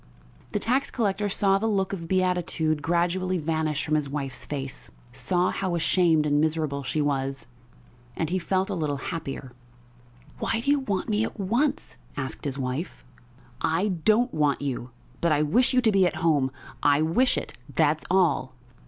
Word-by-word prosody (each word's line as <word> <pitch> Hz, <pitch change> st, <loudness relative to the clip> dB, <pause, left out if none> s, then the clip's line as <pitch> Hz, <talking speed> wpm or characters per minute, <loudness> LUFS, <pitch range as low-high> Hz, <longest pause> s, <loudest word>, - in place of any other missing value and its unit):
The -, -, +2 dB
tax 255 Hz, +7 st, +1 dB
collector 205 Hz, -3 st, 0 dB
saw 195 Hz, 0 st, +3 dB
the 225 Hz, -, 0 dB
look 195 Hz, -3 st, 0 dB
of 165 Hz, -4 st, -5 dB
beatitude 180 Hz, -4 st, +1 dB
gradually 175 Hz, +3 st, +1 dB
vanish 155 Hz, -2 st, -1 dB
from 155 Hz, -, -2 dB
his 150 Hz, -2 st, +1 dB
wife's 135 Hz, -2 st, -4 dB
face, 135 Hz, -2 st, -5 dB, 0.2 s
saw 180 Hz, +6 st, +1 dB
how 185 Hz, -3 st, -1 dB
ashamed 165 Hz, -2 st, +3 dB
and 145 Hz, 0 st, +2 dB
miserable 155 Hz, -3 st, 0 dB
she 140 Hz, +3 st, -2 dB
was 135 Hz, -1 st, -1 dB, 0.7 s
and 160 Hz, 0 st, -2 dB
he 185 Hz, -, +1 dB
felt 190 Hz, +2 st, 0 dB
a -, -, 0 dB
little 150 Hz, -4 st, -1 dB
happier. 135 Hz, -2 st, -5 dB, 0.9 s
"Why 225 Hz, -, 0 dB
do 280 Hz, -, +1 dB
you 290 Hz, -, +3 dB
want 200 Hz, -8 st, -2 dB
me 215 Hz, -1 st, +1 dB
at 225 Hz, -, -5 dB
once?" 235 Hz, +10 st, 0 dB, 0.2 s
asked 130 Hz, 0 st, -4 dB
his 140 Hz, -1 st, -2 dB
wife. 130 Hz, +5 st, -4 dB, 0.6 s
"I 170 Hz, +6 st, +1 dB
don't 215 Hz, +8 st, +2 dB
want 145 Hz, -2 st, +1 dB
you, 125 Hz, -3 st, -3 dB, 0.3 s
but 170 Hz, -, +2 dB
I 150 Hz, 0 st, +3 dB
wish 240 Hz, -, +3 dB
you 255 Hz, -1 st, +3 dB
to 225 Hz, -3 st, +3 dB
be 195 Hz, -2 st, +4 dB
at -, -, -3 dB
home. 145 Hz, -5 st, +3 dB, 0.3 s
I 145 Hz, +1 st, +4 dB
wish 210 Hz, +12 st, +2 dB
it, -, -, -4 dB, 0.2 s
that's 155 Hz, -1 st, +2 dB
all." 160 Hz, -8 st, +2 dB
165 Hz, 170 wpm, -26 LUFS, 145-195 Hz, 0.9 s, be